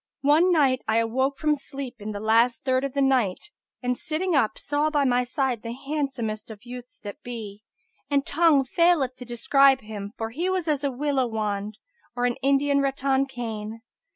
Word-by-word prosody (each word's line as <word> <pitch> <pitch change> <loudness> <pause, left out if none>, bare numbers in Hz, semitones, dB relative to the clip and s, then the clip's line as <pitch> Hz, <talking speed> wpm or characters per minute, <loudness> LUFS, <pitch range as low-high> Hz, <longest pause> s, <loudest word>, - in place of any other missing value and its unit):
One 310 +6 +5
night 275 -6 +3
I 220 0 +2
awoke 260 +5 +1
from 305 -1 +2
sleep, 275 -3 -6
in 210 +1 -6
the 205 - -5
last 230 +4 +2
third 260 0 +2
of 275 -2 -3
the 280 - 0
night[FN#284] 255 -6 +1 0.3
and, 250 0 0
sitting 330 +7 -2
up, 225 -7 +2
saw 290 +1 0
by 295 -2 +1
my 250 -1 +2
side 255 -2 -1
the 230 0 -5
handsomest 265 -7 -3
of 215 0 -10
youths 245 0 -9
that 205 -2 -8
be, 215 -4 -7 0.5
and 280 -1 +1
tongue 315 -3 +4
faileth 295 -2 +2
to 250 - -9
describe 270 +3 +4
him, 210 -1 -7
for 225 0 -4
he 340 +9 -2
was 370 -3 -1
as 295 -2 0
a 280 - +1
willow 270 -1 0
wand 210 -2 -3 0.4
or 245 0 0
an 245 -1 0
Indian 280 +1 +3
rattan 275 0 +1
cane. 225 -3 -6
260 Hz, 185 wpm, -25 LUFS, 230-285 Hz, 0.5 s, One